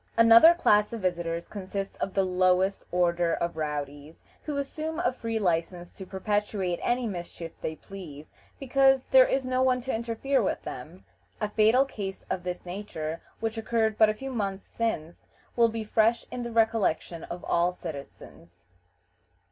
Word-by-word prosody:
Another 230 +9 +8
class 210 -10 +3
of 230 - -5
visitors 170 -2 -2
consists 195 -1 -5
of 195 - -4
the 195 - +3
lowest 185 +1 +2
order 175 -1 +2
of 170 -1 -3
rowdies, 150 0 -5 0.2
who 295 -2 -4
assume 310 +3 -4
a 245 - +1
free 230 -3 -3
license 175 -2 -1
to 190 - -10
perpetrate 195 -2 -1
any 245 0 0
mischief 175 -4 -6
they 160 - -3
please, 155 -6 -11 0.3
because 270 0 +3
there - - +6
is 270 - 0
no 255 0 0
one 255 -1 +3
to 260 +2 -3
interfere 235 +4 0
with 195 - -2
them. 160 +9 -9 0.3
A 210 - 0
fatal 220 +5 +4
case 195 -7 -6
of 185 - -1
this 180 0 -5
nature, 170 -4 -5 0.2
which 225 0 -2
occurred 220 -1 0
but 220 -1 +7
a 215 - -1
few 270 +4 -6
months 200 -5 -3
since, 175 -8 -4 0.3
will 235 -1 +4
be 225 0 -4
fresh 225 +2 +2
in 250 - -4
the 235 0 -5
recollection 220 -7 +1
of 175 +1 -7
all 170 +1 +2
citizens. 140 - -10
200 Hz, 165 wpm, -27 LUFS, 175-230 Hz, 0.3 s, Another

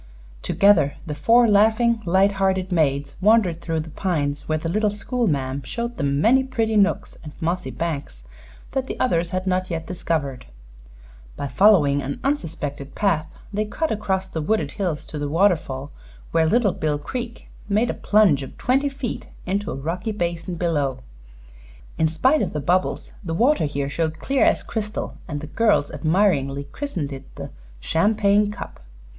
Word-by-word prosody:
Together 185 -8 +3
the 155 - -4
four 230 +11 +4
laughing, 220 +2 +3
light 190 +3 +4
hearted 190 -1 0
maids 140 -4 +1
wandered 195 -5 +3
through 165 -2 -2
the 155 0 -6
pines, 145 -6 -2
where 155 - +2
the 155 - -4
little 210 +5 +1
school 235 +4 -2
ma'am 135 -3 -1
showed 235 - -5
them 140 -1 0
many 255 - +4
pretty 225 -4 -1
nooks 205 -1 +1
and 150 -1 -9
mossy 175 +3 -1
banks 140 - -4 0.5
that 260 -1 -2
the - - -5
others 170 -9 +1
had 185 +1 -2
not 185 0 0
yet 165 -1 -3
discovered. 160 - -3 0.9
By 140 - -3
following 145 - +4
an 140 +1 -4
unsuspected 155 - -3
path, 170 -7 +1 0.3
they 210 +1 +1
cut 310 +10 -2
across 190 -3 -1
the 160 -4 -4
wooded 215 +8 0
hills 180 -7 -3
to 150 - -6
the 145 0 -2
waterfall, 155 -6 +1 0.4
where 160 -1 +3
Little 225 -3 +3
Bill 150 -1 -1
Creek 235 - -6 0.2
made 215 +4 +2
a - - -4
plunge 205 -10 +3
of 135 - -9
twenty 270 +3 +1
feet 270 -3 -5 0.2
into 200 +2 -1
a - - -3
rocky 170 +10 -3
basin 175 -2 -3
below. 150 -6 -1 1.0
In 160 - +4
spite 260 - +2
of - - -2
the 150 - -2
bubbles, 180 +6 0
the 165 -2 -3
water 245 - +3
here 140 -1 -2
showed 160 +2 -2
clear 270 +10 +1
as - - +2
crystal, 215 -1 -4
and 145 -4 -4
the - - -6
girls 205 -3 +2
admiringly 155 -6 +1
christened 185 - -4
it 135 0 -11
the - - -7 0.3
"Champagne 205 - +2
Cup." 210 - -8
175 Hz, 165 wpm, -23 LUFS, 150-210 Hz, 1.0 s, four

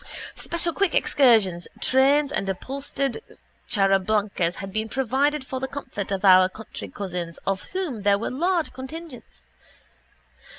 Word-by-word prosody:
Special 340 0 -2
quick 390 -2 +1
excursion 220 -10 +4 0.2
trains 275 +2 +3
and 195 -10 -2
upholstered 275 - -3 0.5
charabancs 195 -2 +1
had 195 0 -7
been 220 +1 -2
provided 270 +4 0
for 260 -1 -4
the 265 - -3
comfort 255 -9 -6
of 195 0 -1
our 185 -1 +7
country 220 +4 -8
cousins 180 -4 -5
of 195 -1 -1
whom 345 - -3
there 200 0 +3
were 220 - -3
large 340 +5 0
contingents. 260 - -9
235 Hz, 130 wpm, -24 LUFS, 195-280 Hz, 0.5 s, our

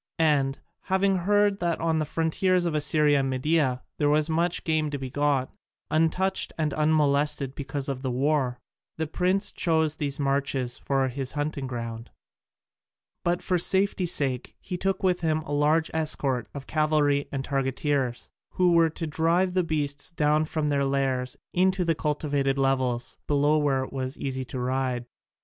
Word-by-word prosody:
And, 145 -4 +2 0.3
having 190 0 +2
heard 205 +2 +2
that 170 -1 -1
on 160 -1 +1
the 155 - 0
frontiers 175 +3 +1
of 170 - 0
Assyria 150 -1 +3
and 135 -1 0
Media 130 -1 +1 0.2
there 145 -1 +3
was 155 +2 +2
much 170 +2 0
game 155 -2 +1
to 145 - -3
be 130 -2 -6
got, 145 -2 0 0.4
untouched 180 +5 +1
and 155 -3 0
unmolested 150 -3 +1
because 140 0 -4
of 135 -2 -3
the 130 - -2
war, 130 -1 0 0.4
the 160 - -1
prince 185 +5 0
chose 160 -3 +1
these 145 -1 -2
marches 135 -3 -1
for 135 -1 0
his 130 0 -5
hunting 145 -2 -2
ground. 115 -2 -6 1.1
But 175 +1 0
for 180 -2 +1
safety 190 0 +1
sake 135 -6 -2
he 180 - -5
took 190 +1 -1
with 180 -2 +2
him 155 -1 +1
a 145 - -8
large 150 +3 +2
escort 140 -6 0
of 140 -1 -8
cavalry 150 -2 +1
and 135 -1 -3
targeteers, 135 -2 -1 0.2
who 180 -1 +3
were 165 -1 +5
to 165 +1 -5
drive 165 +4 +1
the 185 -1 +2
beasts 145 -2 -1
down 150 -1 +2
from 155 -1 -2
their 140 -1 +1
lairs 135 -2 -1 0.2
into 185 0 +2
the 165 - +2
cultivated 145 -3 -1
levels 130 -3 0
below 145 +1 +3
where 135 -3 +1
it 130 - -9
was 130 0 -4
easy 130 -1 -3
to 130 - -7
ride. 125 -1 -1
150 Hz, 165 wpm, -26 LUFS, 135-165 Hz, 1.1 s, were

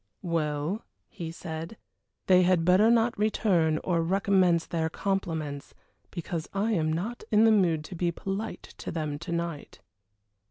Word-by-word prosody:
"Well," 160 +3 -1 0.3
he 170 -5 -6
said, 165 +4 -7 0.5
"they 185 -1 +6
had 180 -2 +3
better 185 +5 +5
not 235 0 +3
return 185 -7 +2
or 170 -2 +1
recommence 185 -1 +2
their 160 -1 -1
compliments, 160 -7 -3 0.3
because 170 -2 -5
I 210 +3 +1
am 160 -6 +1
not 205 +10 -3
in 215 0 +5
the 225 - +6
mood 175 -7 +3
to 170 - -9
be 175 0 0
polite 195 +5 -5 0.2
to - - -6
them 155 -3 -3
to 170 - -7
night." 170 -3 -4
175 Hz, 150 wpm, -28 LUFS, 160-195 Hz, 0.5 s, they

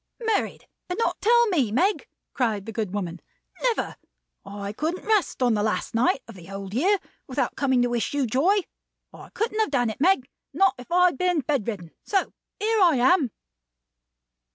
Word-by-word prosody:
"Married, - - -3 0.2
and 360 - -3
not 460 - -1
tell 475 +2 +5
me, 280 - +1
Meg!" 375 - +1 0.3
cried 220 -6 -1
the 225 - -6
good 215 -4 -3
woman. 180 -4 -4 0.4
"Never! - - 0 0.5
I 200 0 -6
couldn't 320 +9 -3
rest 420 -10 +1
on 245 -2 +3
the 210 - +1
last 215 +2 -1
night 250 +3 +2
of 230 - -10
the 185 -2 -13
Old 195 0 -7
Year 370 - +3 0.3
without - - -1
coming 260 -3 +2
to 245 - +1
wish 240 -1 -1
you 285 -2 0
joy. 320 - +2 0.5
I - - -12
couldn't 440 0 -2
have 440 - +2
done 245 -5 +1
it, 220 - -10
Meg. 315 -7 +3 0.3
Not 390 -1 +4
if 250 - -12
I 360 +1 +5
had 345 -7 +1
been 360 -4 +2
bed 270 -5 -1
ridden. 185 -8 -5
So 390 -2 0 0.3
here 435 +1 +1
I 345 -5 +6
am." 265 +3 +4
265 Hz, 185 wpm, -25 LUFS, -, 0.5 s, I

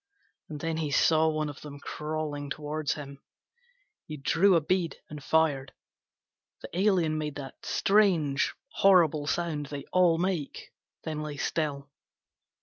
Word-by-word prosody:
And 150 -2 -6
then 165 -1 -2
he 155 -2 -1
saw 160 +3 +4
one 155 -1 0
of 145 -1 -8
them 145 -1 -9
crawling 150 -1 -4
toward 150 +1 -4
him. 140 -3 -4 0.9
He 155 - -6
drew 180 +7 +3
a - - +5
bead 170 +2 -1
and 150 -2 -8
fired. 145 -3 +1 0.9
The - - -7
alien 175 -5 +2
made 150 -2 -4
that 135 -2 -9
strange 175 -9 +2
horrible 165 -6 +4
sound 155 -2 -1
they 140 0 -6
all 180 -3 +4
make, 175 -4 -3 0.3
then 155 -1 -4
lay 150 -1 -5
still. 145 -2 -2
155 Hz, 140 wpm, -28 LUFS, 145-165 Hz, 0.9 s, a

